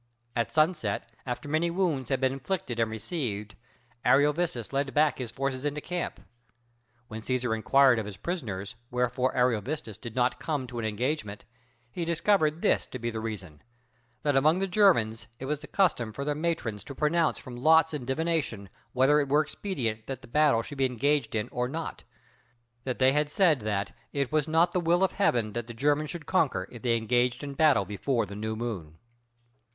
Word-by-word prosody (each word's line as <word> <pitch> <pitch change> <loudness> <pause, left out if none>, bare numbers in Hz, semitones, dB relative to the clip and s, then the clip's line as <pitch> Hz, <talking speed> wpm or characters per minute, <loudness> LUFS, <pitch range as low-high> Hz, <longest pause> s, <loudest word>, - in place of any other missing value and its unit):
At 115 - 0
sunset, 155 - +1 0.2
after 125 +3 -4
many 155 +3 +1
wounds 170 -8 0
had 135 - +1
been 130 0 +2
inflicted 135 -4 -3
and 115 -1 +2
received, 110 - -4 0.5
Ariovistus 145 -3 +2
led 135 0 -1
back 150 -3 +3
his 125 -3 -4
forces 130 +1 -3
into 145 0 -1
camp. 175 +3 -4 0.9
When 110 -2 -7
Cæsar 125 -1 0
inquired 130 +2 +4
of 105 - -4
his 100 - -8
prisoners 105 - -4 0.2
wherefore 125 +1 0
Ariovistus 120 -1 0
did 115 -1 -8
not 125 -1 +1
come 145 -5 -2
to 120 -1 -6
an 115 - -2
engagement, 110 -1 -2 0.5
he 170 - -3
discovered 170 -1 +2
this - - +2
to - - -6
be 120 -1 -3
the 110 - -4
reason 100 -9 -6 0.6
that 145 -2 +2
among 155 +5 +4
the 195 - 0
Germans 165 - +3
it 130 - -6
was 150 +1 -1
the 150 - -11
custom 145 - +1
for 140 +5 -4
their 150 - +1
matrons 150 -10 -2
to 140 - -8
pronounce 155 +2 +2
from 125 - -9
lots 160 +5 +4
and 135 -5 -4
divination 135 - -1 0.2
whether 135 +4 +4
it 140 -2 -1
were 150 +2 +4
expedient 120 - -4
that 130 -2 -5
the - - -11
battle 140 -3 +3
should 140 +3 -8
be 135 - +4
engaged 130 0 0
in 105 -1 0
or 125 0 -1
not; 160 +3 -5 0.8
that 130 -2 -2
they 130 0 +5
had 150 +1 +1
said 160 -3 +3
that 105 -2 -2 0.2
"it 140 -3 -1
was 155 -1 +1
not 165 +2 +3
the 180 - +1
will 175 +2 +2
of 190 - +3
heaven 120 - +1
that 120 -1 -4
the 120 - -8
Germans 145 +4 +1
should 165 +1 -6
conquer, 135 - +1
if 120 - -10
they 120 -2 +2
engaged 120 +3 +1
in 140 -1 -5
battle 145 -8 +4
before 115 +3 -1
the 100 - -9
new 110 +1 -3
moon." 100 -10 -5
130 Hz, 190 wpm, -28 LUFS, 115-155 Hz, 0.9 s, they